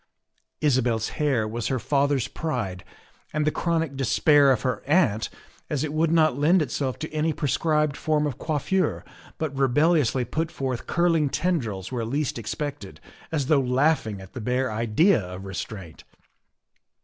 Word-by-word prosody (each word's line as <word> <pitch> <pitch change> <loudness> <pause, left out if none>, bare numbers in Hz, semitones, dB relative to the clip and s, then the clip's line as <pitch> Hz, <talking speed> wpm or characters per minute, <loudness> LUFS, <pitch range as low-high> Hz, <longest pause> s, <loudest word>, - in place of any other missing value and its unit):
Isabel's 125 -6 +1
hair 135 -8 0
was 115 +1 -3
her 130 - 0
father's 140 0 +1
pride 110 - -4 0.5
and 150 0 0
the 155 - +2
chronic 165 -4 -1
despair 140 +2 +4
of 130 - 0
her 125 -5 -1
aunt, 130 - +2 0.4
as 150 -2 -1
it 150 -1 -3
would 160 +1 +2
not 155 -4 +3
lend 155 +5 +3
itself 135 -1 -3
to 155 0 -6
any 155 +1 +1
prescribed 150 +1 0
form 150 -1 0
of 145 -5 -4
coiffure, 160 +3 -1 0.3
but 155 -3 -3
rebelliously 135 -1 +2
put 160 +7 -2
forth 130 -6 -4
curling 165 -4 +2
tendrils 115 - -2
where 120 -3 -2
least 135 +2 -2
expected, 145 +6 -5 0.3
as 150 -4 0
though 140 0 +3
laugh 135 +2 +2
ing 105 -3 -5
at 95 - -13
the 125 - -6
bare 125 +2 0
idea 115 - +3
of 90 +1 -8
restraint. 95 -3 -7
140 Hz, 155 wpm, -25 LUFS, 120-155 Hz, 0.5 s, despair